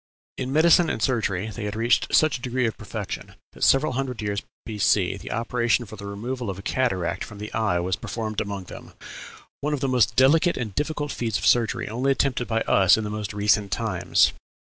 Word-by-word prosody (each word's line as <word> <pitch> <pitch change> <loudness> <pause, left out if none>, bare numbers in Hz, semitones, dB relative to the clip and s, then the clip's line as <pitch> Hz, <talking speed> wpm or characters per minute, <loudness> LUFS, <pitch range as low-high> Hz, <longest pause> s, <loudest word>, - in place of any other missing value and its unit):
In 130 0 -4
medicine 165 +3 +5
and - - -2
surgery 110 -5 0
they 105 - -6
had 105 0 -4
reached 115 +2 +2
such 155 -3 +4
a 125 - -6
degree 125 0 -1
of 110 - -1
perfection 110 -1 -6 0.2
that - - -7
several 135 +2 +4
hundred 130 -2 -3
years 105 -2 -2 0.2
B.C. 105 -4 +1
the - - -8
operation 120 +1 0
for 110 - -10
the 100 -1 -8
removal 120 +4 -4
of 95 0 -6
cataract 95 -8 -1
from 105 - -10
the 105 +1 -7
eye 110 -6 +1
was 90 +1 -1
performed 110 -2 -4
among 100 -2 -4
them; - - -11 0.7
one 150 +1 -1
of - - -6
the 135 - -1
most 120 -5 +2
delicate 160 +7 +4
and 110 -5 -4
difficult 145 +1 -2
feats 115 -3 -2
of - - -4
surgery, 115 -3 +2
only 125 +6 0
attempted 130 -2 0
by 115 0 0
us 95 -3 +4
in 110 - -2
the 105 - -4
most 105 -1 -4
recent 105 -1 +1
times. 95 -5 +2
110 Hz, 205 wpm, -24 LUFS, 100-130 Hz, 0.7 s, medicine